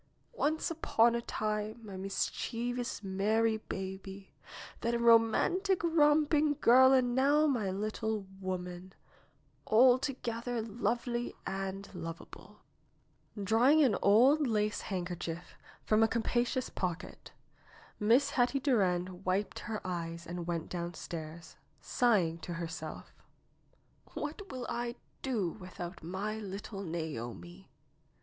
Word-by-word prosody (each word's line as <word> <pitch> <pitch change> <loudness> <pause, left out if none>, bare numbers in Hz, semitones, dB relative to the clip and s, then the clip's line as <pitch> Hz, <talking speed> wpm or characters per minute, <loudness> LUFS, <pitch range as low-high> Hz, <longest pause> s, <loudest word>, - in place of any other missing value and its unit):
'^Once 315 -6 0
upon 235 -7 +3
a 235 - -1
time 215 0 -3
my 200 -2 -8
mischievous, 230 +5 -3
merry 215 +4 +1
baby, 190 -1 -7 0.5
then 235 +1 0
a - - +2
romantic, 235 - +4
romping 300 -2 +3
girl 260 +1 +7
and 255 -2 +3
now 285 +4 +4
my 240 -9 +1
little 215 +1 -2
woman, 185 -1 -5 0.8
alto 255 +4 +5
gether 235 0 -2
lovely 240 +2 -2
and 195 +1 -4
lovable." 165 -2 -9 0.8
Drawing 245 +10 +5
an 240 -7 +3
old 260 +9 +5
lace 210 -2 0
handkerchief 175 -2 -5 0.3
from 215 0 +3
a 225 - +6
capacious 240 +3 0
pocket. 180 -3 -5 0.7
Miss 245 +7 +4
Hetty 275 -1 +2
Durand 185 -8 +1
wiped 190 +2 -1
her 220 -2 -5
eyes 170 -2 -4
and 175 0 -5
went 170 -2 -2
downstairs, 170 -2 -6 0.2
sighing 185 -9 +2
to 175 - -6
herself: 165 -2 -6 1.0
^'What 320 +7 -5
will 255 -2 -5
I 240 0 -3 0.3
do 220 -10 -1
without 180 -3 -8
my 195 +6 -4
little 200 0 -6
Naomi?" 165 - -6
215 Hz, 110 wpm, -32 LUFS, 185-245 Hz, 1.0 s, girl